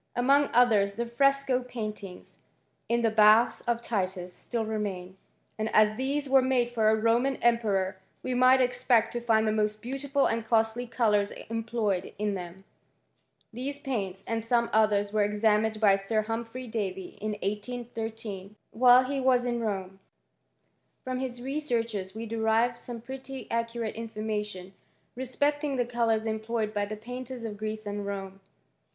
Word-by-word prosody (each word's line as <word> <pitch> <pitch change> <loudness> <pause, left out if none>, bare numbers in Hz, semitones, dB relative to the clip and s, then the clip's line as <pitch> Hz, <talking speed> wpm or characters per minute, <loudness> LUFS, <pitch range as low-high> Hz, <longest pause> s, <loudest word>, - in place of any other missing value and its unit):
Among 275 +4 +3
others 215 -5 +4
the 235 - -2
fresco 270 +1 +2
pain 230 -4 -4 1.0
in 235 0 +1
the 225 - +3
baths 215 +2 +5
of 235 0 0
Titus, 185 -5 -2
still 230 +3 -3
remain; 195 -4 -4 0.4
and 215 0 -1
as 215 0 +7
liiese 275 +5 -2 0.2
made 255 -2 +2
for 220 -2 +3
a 220 - +4
Roman 235 +5 +2
emperor, 205 -6 +1 0.2
we 255 - -2
might 255 +1 +5
expect 245 -2 +2
to 240 - -1
the 220 -2 +2
most 215 0 0
beautiful 275 +4 -1
and 230 0 0
costly 225 +2 +1
colours 210 -4 +2 0.2
employed 225 -4 -2
them. 190 -3 -4 0.9
These 270 +4 -4
paints, 200 -9 -4
and 225 -1 -2
some 235 0 +1
others, 210 -1 +2
were 215 -1 +3
examin 215 +1 +1
by 200 -3 +5
Sir 215 +2 -1
Humphrey 230 +3 -5
Davy, 195 -5 -4
in 215 0 -2
1813, 220 -2 -5 0.2
while 250 +2 +6
he 275 +2 -2
wat 255 -2 +3
Rome. 205 -6 -3 1.0
From 255 0 -3
his 245 -2 -4
researches 235 -9 -2
we 225 +1 -5
derive 225 +2 +1
some 235 -1 -8
pi 265 0 -8
accurate 230 -1 -2
information 210 -4 -5 0.4
respecting 285 +3 -1
the 245 -2 +1
colours 230 -2 0
emp 220 0 -3
by 215 -3 -1
the 215 +1 -5
painters 250 +2 -7
of 220 -2 -4
Greece 215 +1 -5
and 205 0 -4
Rome. 195 -1 -5
225 Hz, 145 wpm, -28 LUFS, 210-245 Hz, 1.0 s, as